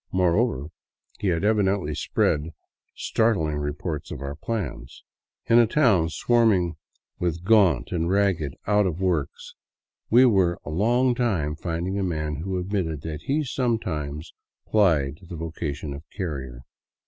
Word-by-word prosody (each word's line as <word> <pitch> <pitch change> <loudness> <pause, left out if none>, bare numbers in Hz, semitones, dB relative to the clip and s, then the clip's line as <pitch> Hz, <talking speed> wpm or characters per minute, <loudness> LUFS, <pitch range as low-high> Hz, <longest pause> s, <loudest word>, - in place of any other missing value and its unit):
Moreover, 90 - +1 0.5
he 105 - -1
had 85 0 +1
evidently 100 -6 +1
spread 75 +2 0 0.4
startling 90 -10 +1
reports 75 +2 -4
of - - -6
our 70 +1 -5
plans. 75 - -5 0.4
In 115 +1 +5
a 120 - +5
town 105 - +3
swarming 105 -4 +2 0.5
with 85 -1 -2
gaunt 95 - +4
and 85 -1 0
ragged 95 -8 +1
out 105 -1 +3
of 85 -1 -3
works 90 -7 -2 0.6
we 125 +3 +7
were 95 -7 +3
a 75 - -5
long 120 +9 +2
time 95 - 0
finding 85 +4 -3
a - - 0
man 75 -4 -2
who 95 +4 -3
admitted 90 -5 -2
that 80 -1 -6
he 150 +3 +1
sometimes 80 - -2 0.3
plied 80 -9 +2
the 90 -2 -9
voca 80 -2 -4
tion 75 0 -6
of 70 - -8 0.2
carrier. 70 - -4
85 Hz, 140 wpm, -25 LUFS, 75-105 Hz, 0.6 s, we